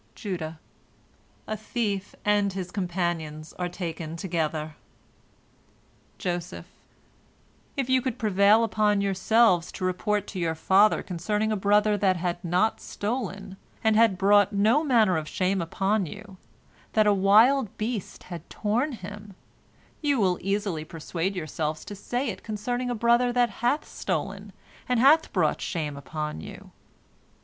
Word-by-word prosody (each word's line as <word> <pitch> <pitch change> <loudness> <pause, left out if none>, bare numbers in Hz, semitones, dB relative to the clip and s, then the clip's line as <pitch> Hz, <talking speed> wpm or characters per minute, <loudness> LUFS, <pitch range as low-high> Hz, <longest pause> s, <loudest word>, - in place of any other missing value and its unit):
Judah: 165 -5 -5 0.9
"A 215 - -3
thief 210 -2 -3
and 205 -1 +2
his 185 -2 -5
companions 170 -5 -3
are 180 0 -1
taken 165 -3 -5
together." 160 -3 -2 1.4
Joseph: 175 -1 -4 1.1
"If 270 -3 0
you 260 0 +3
could 255 -1 -3
prevail 210 0 +4
upon 210 -2 +2
yourselves 195 -1 +3
to 185 - -4
report 205 +3 0
to 190 - -5
your 165 -2 0
father 195 +6 +4
concerning 210 +5 -1
a - - +1
brother 205 +1 +3
that 190 -2 +2
had 175 0 -3
not 180 +6 +1
stolen, 205 -3 -4 0.3
and 220 -1 +3
had 220 -4 +4
brought 205 +1 +4
no 215 +9 +3
manner 225 - +3
of 155 -1 -4
shame 190 0 0
upon 195 +3 0
you, 200 +2 -10 0.6
that 215 -1 +4
a 210 - +5
wild 220 +4 +4
beast 215 -2 -4
had 175 -3 -9
torn 240 +8 -1
him, 205 -1 -9 0.7
you 285 -4 +1
will 185 -4 +2
easily 195 -5 -1
persuade 165 +4 -4
yourselves 155 -2 -3
to - - -7
say 245 +6 -3
it 200 - -6
concerning 245 +4 -3
a 245 - -1
brother 235 +2 +3
that 245 -2 +2
hath 245 +6 +1
stolen, - - -4 0.4
and 250 -2 +2
hath 295 +6 +5
brought - - +1
shame 155 -5 -3
upon 150 - -5
you. - - -11
200 Hz, 140 wpm, -26 LUFS, 175-220 Hz, 1.4 s, a